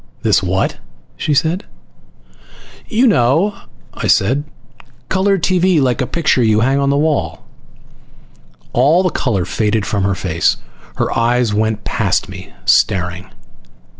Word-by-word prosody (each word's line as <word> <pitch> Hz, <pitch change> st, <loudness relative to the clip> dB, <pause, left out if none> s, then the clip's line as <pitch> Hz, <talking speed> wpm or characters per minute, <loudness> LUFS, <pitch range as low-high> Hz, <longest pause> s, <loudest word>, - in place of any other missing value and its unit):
"This -, -, +3 dB
what?" -, -, -1 dB, 0.4 s
she 150 Hz, -2 st, -1 dB
said. 165 Hz, +7 st, 0 dB, 1.2 s
"You 235 Hz, +3 st, +2 dB
know," 165 Hz, -, +2 dB, 0.4 s
I -, -, -4 dB
said. 130 Hz, +9 st, +2 dB, 0.6 s
"Color 195 Hz, +1 st, +2 dB
TV 185 Hz, -1 st, +2 dB
like 125 Hz, -4 st, +1 dB
a 130 Hz, -, -1 dB
picture 150 Hz, -6 st, +1 dB
you 110 Hz, -2 st, +3 dB
hang 135 Hz, +4 st, +2 dB
on 140 Hz, 0 st, +1 dB
a 140 Hz, -, +1 dB
wall." 145 Hz, -, -1 dB, 1.3 s
All 150 Hz, +9 st, +3 dB
the 185 Hz, -, 0 dB
color 105 Hz, -, -1 dB
faded 105 Hz, +2 st, -1 dB
from 100 Hz, -, -1 dB
her 100 Hz, 0 st, 0 dB
face. 85 Hz, -4 st, 0 dB, 0.4 s
Her -, -, -2 dB
eyes 120 Hz, -1 st, +1 dB
went 110 Hz, 0 st, -1 dB
past 100 Hz, -5 st, -1 dB
me, 95 Hz, -1 st, -10 dB
staring. 90 Hz, 0 st, +1 dB
125 Hz, 135 wpm, -16 LUFS, 105-160 Hz, 1.3 s, This